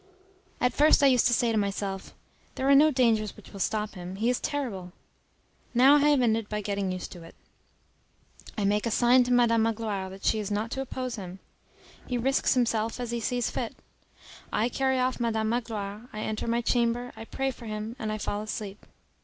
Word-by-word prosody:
At 250 -1 +2
first 300 +1 +5
I 270 -2 +6
used 245 - +4
to 240 - +2
say 235 0 +2
to 220 - +2
myself, 195 -1 -3 0.4
"There 265 - -1
are 280 - +6
no 295 +3 +7
dangers 230 -6 +1
which - - -15
will 200 - -8
stop 215 +2 -1
him; 180 -1 -7
he 225 +5 +1
is 250 - -1
terrible." 205 -12 -4 0.8
Now 270 +4 +7
I 295 +1 +4
have 285 -4 +4
ended 225 -2 +1
by 210 - -2
getting 200 -2 -2
used 185 -1 -5
to 175 - -10
it. 165 - -13 1.2
I 205 - 0
make 210 +3 +1
a - - +1
sign 245 +3 +5
to 250 - -2
Madam 235 -2 +4
Magloire 215 -4 -1
that 190 +1 -10
she 220 - +2
is 210 -1 -3
not 210 +3 -2
to 265 - -2
oppose 255 -2 -4
him. 185 -2 -7 0.7
He 250 - -1
risks 270 +3 +2
himself 230 -2 0
as 245 -1 -4
he 235 - -1
sees 245 +1 -1
fit. - - -4 0.8
I 225 +3 +1
carry 265 0 +1
off 255 0 0
Madam 220 -2 0
Magloire, 225 -1 -4
I 215 - -6
enter 215 +1 -3
my 235 +1 +1
chamber, 240 +1 0
I - - -8
pray 270 +3 -2
for 235 -2 -11
him 215 +2 -5
and 215 -1 -3
fall 205 0 -2
asleep. 210 -1 -6
230 Hz, 205 wpm, -27 LUFS, 210-250 Hz, 1.2 s, no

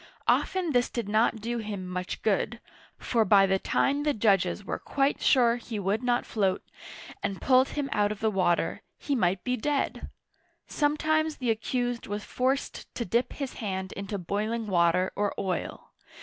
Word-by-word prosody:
Often 365 -4 +2
this 245 -2 +2
did 235 -4 -3
not 220 +1 +2
do 235 +2 -2
him 205 -4 -5
much 180 0 -4
good, 220 +2 0 0.4
for 230 -2 +1
by 195 -1 +6
the 190 0 +1
time 280 +7 +1
the 295 -1 +1
judges 200 -3 +2
were - - -3
quite 275 0 0
sure 240 -3 +4
he 230 -2 -6
would 200 +3 0
not 245 -1 +1
float, 195 -4 0 0.6
and 195 - -3
pulled 260 0 +4
him 285 -2 0
out 205 0 +2
of 210 - -5
the 220 0 +1
water, 185 -3 +1 0.2
he 285 - -3
might 185 -7 +1
be 250 - 0
dead! 280 +4 -2 0.6
Sometimes 310 +1 +1
the 245 -3 0
accused 245 +2 -2
was 205 +1 -4
forced 265 +2 -2
to 235 - -2
dip 235 +6 0
his 275 -3 -5
hand 190 -3 -3
into 200 +1 -4
boiling 215 +5 -2
water 180 -1 +2
or 205 0 -1
oil. 185 -2 -4
220 Hz, 170 wpm, -28 LUFS, 195-255 Hz, 0.6 s, by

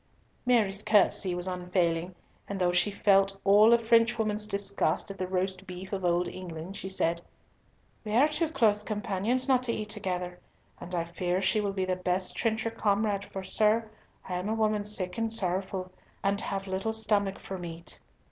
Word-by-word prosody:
Mary's 210 -5 +2
courtesy 200 -3 +3
was 180 0 -1
unfailing, 180 -1 -1 0.3
and 200 -1 -4
though 180 -1 +2
she 180 +3 +3
felt 195 -1 +3
all 205 +3 +6
a 235 - +7
Frenchwoman's 225 -2 +2
disgust 200 -1 -1
at 195 - -10
the 185 - -2
roast 185 +1 -2
beef 185 +2 -8
of 190 -1 -3
old 175 0 +2
England, 180 0 -7
she 190 - -5
said, 170 -3 0 0.8
"We 215 -1 -3
are 270 +5 +6
too 310 +1 -1
close 220 -8 +2
companions 210 +4 -1
not 260 -2 +4
to 250 -2 -1
eat 215 -2 -4
together, 180 -4 -3 0.4
and 180 +1 -6
I 170 - 0
fear 175 +2 -2
she 195 +3 +2
will 200 -1 -2
be 190 -1 -1
the 185 -1 -1
best 185 0 -1
trencher 225 0 0
comrade, 205 -2 0
for, 190 -1 -7
sir, 215 +3 +1 0.4
I 180 -1 -2
am 190 +4 -3
a 220 - 0
woman 215 -2 +1
sick 185 -2 0
and 225 -1 0
sorrowful, 185 -2 -1 0.3
and 200 +1 +1
have 195 -1 -3
little 190 +3 -2
stomach 210 -3 0
for 190 -1 -7
meat." 170 -1 -8
195 Hz, 180 wpm, -29 LUFS, 185-215 Hz, 0.8 s, a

